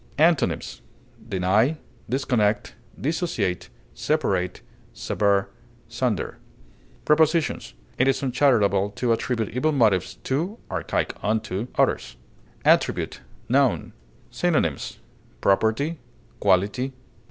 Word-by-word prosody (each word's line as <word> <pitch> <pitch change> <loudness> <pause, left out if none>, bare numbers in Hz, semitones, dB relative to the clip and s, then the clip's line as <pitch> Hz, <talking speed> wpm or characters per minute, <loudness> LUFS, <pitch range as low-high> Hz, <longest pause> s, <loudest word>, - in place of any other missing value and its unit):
Antonyms: 160 0 +2 0.5
deny, 100 - +2 0.3
disconnect, 120 -5 +1 0.3
dissociate, 135 - -1 0.2
separate, 95 - -1 0.3
sever, 100 -1 +1 0.4
sunder. - - -2 0.7
Prepositions: 155 - +2 0.2
It 130 - +4
is 135 +1 +1
uncharitable 120 -7 +3
to 125 -2 0
attribute 115 -2 -1
evil 150 +6 0
motives 95 - +2
to 170 - -1
(archaic - - -1
unto) 110 0 -1
others. - - +1 0.5
ATTRIBUTE, - - +2 0.3
n. - - +2 0.4
Synonyms: - - 0 0.4
property, 110 - +1 0.4
quality. 105 +7 +2
120 Hz, 85 wpm, -24 LUFS, 100-145 Hz, 0.7 s, It